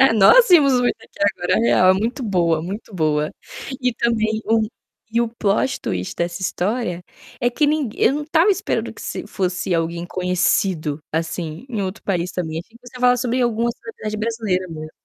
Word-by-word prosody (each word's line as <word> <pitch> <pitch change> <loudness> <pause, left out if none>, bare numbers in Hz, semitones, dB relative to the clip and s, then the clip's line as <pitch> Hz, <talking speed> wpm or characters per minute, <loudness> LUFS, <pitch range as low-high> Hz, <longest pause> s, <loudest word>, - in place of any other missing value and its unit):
Nós 465 - +7
vimos 290 -7 +6
o 245 0 +2
Ricky - - -1
aqui - - -21 0.2
agora, 175 - +1
real, 185 -5 +4
é - - +4
muito 235 +7 -2
boa, 170 -6 +1
muito 200 +4 -7
boa. 155 -3 0 0.5
E 250 -2 +1
também 220 -2 0
o 225 0 +3 0.5
e 235 - +2
o 235 - +1
plot 225 +3 0
twist 90 0 -3
dessa 175 +1 -2
história 190 0 -2 0.4
é 245 - +3
que 295 +5 +1
nin 295 -5 +1
eu 270 - +3
não 300 - -2
estava 330 +6 +3
esperando - - -2
que - - -12
se - - -5
fosse 185 -1 -2
alguém 170 +1 -1
conhecido, 180 -4 0
assim, 165 +4 -3
em 220 -5 -3
outro 190 +2 -5
país 180 -2 -1
também, 160 -3 -3
achei 225 +7 -13
que 245 0 -17
você 250 - -14
ia 250 - -10
falar 250 0 +5
sobre 250 +1 0
alguma 235 0 +1
celebridade 215 -2 -7
brasileira 215 -5 -1
mesmo. 155 -1 -7
210 Hz, 190 wpm, -21 LUFS, 175-240 Hz, 0.5 s, Nós